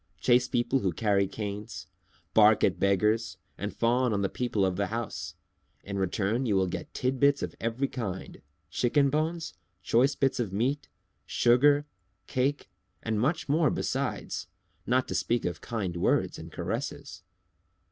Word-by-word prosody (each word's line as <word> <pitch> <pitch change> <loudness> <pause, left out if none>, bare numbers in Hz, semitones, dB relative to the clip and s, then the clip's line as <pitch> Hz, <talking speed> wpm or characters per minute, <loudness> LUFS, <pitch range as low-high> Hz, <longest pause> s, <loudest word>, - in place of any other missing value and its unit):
"Chase 125 +5 +4
people 125 +3 +1
who 95 -7 0
carry 100 +1 +2
canes, 105 -4 -6 0.5
bark 110 0 +6
at 95 - +2
beggars, 105 +1 +1 0.2
and 105 +1 -4
fawn 120 0 +1
on 100 -1 0
the 95 - +1
people 110 -5 0
of 95 -1 0
the 100 +1 0
house. 115 +2 -4 0.5
In 100 -1 -4
return 105 +6 0
you 105 - +2
will 95 0 +3
get 90 - -5
tidbits 140 +2 +2
of - - -4
every 115 +4 0
kind, 100 -9 -6 0.3
chicken 140 +3 +2
bones, 160 +2 -1 0.3
choice 130 +8 +3
bits 135 -2 +1
of 110 -6 -1
meat, 125 +9 -1 0.4
sugar, 145 +5 +4 0.4
cake, 135 +6 -1 0.4
and 110 -2 -1
much 155 +8 0
more 155 +2 +3
beside, - - -2 0.5
not 125 +1 +2
to - - -4
speak 120 0 0
of 85 -2 -3
kind 100 -7 -3
words 85 - +1
and 80 +1 -9
caresses." 115 - -5
115 Hz, 150 wpm, -28 LUFS, 100-135 Hz, 0.5 s, bark